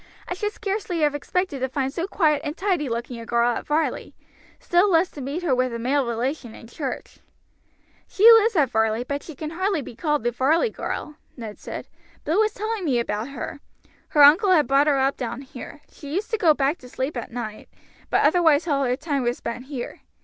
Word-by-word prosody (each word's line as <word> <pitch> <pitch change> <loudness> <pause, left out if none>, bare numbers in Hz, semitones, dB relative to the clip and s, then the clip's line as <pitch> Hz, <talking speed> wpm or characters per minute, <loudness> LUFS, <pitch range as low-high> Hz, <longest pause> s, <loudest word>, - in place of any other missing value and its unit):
I - - -2
should 415 +3 -2
scarcely 395 -5 -3
have 295 -1 +3
expected 295 +1 -2
to 260 +1 -1
find 270 0 -2
so 345 +2 -2
quiet 310 -7 +2
and 300 +1 -4
tidy 360 -8 0
looking 235 +1 -4
a 230 - -8
girl 235 0 +2
at - - -6
Varley, 305 +2 -1 0.4
still 355 +4 +3
less 345 0 +3
to 290 - -9
meet 285 +7 -4
her 310 -7 +2
with 255 0 +1
a - - -2
male 260 +3 0
relation 240 +1 -3
in - - -12
church." 260 +3 -6 0.9
"She 395 - -3
lives 450 -1 +6
at 280 -7 +3
Varley, 220 +1 +1
but 285 +3 -3
she 320 - -10
can 305 +3 -6
hardly 370 -2 -1
be 235 - -10
called 295 -3 -1
a 240 - +2
Varley 310 - +2
girl," 300 0 -5 0.2
Ned 220 -3 -8
said. - - -7 0.4
"Bill 330 +7 +1
was 435 0 +3
telling 435 -1 -3
me 275 -7 +1
about 220 -1 -2
her. 275 +1 -6 0.5
Her 295 - +5
uncle 330 +9 +7
had 365 - +6
her 300 - +4
brought 275 +3 +3
up 275 -1 +2
down 245 0 -4
here. 265 +2 -10
She 285 -2 -10
used 415 +5 -2
to 445 - +1
go 320 -6 +5
back 280 +4 0
to 250 - -13
sleep 265 +4 -3
at 240 - -5
night, 220 -3 -6 0.4
but - - +3
otherwise 335 -2 +4
all 280 -3 +1
her 250 -1 +1
time 285 0 -2
was 240 0 -1
spent 235 +2 -6
here. 265 -3 -6
285 Hz, 215 wpm, -24 LUFS, 250-340 Hz, 0.9 s, uncle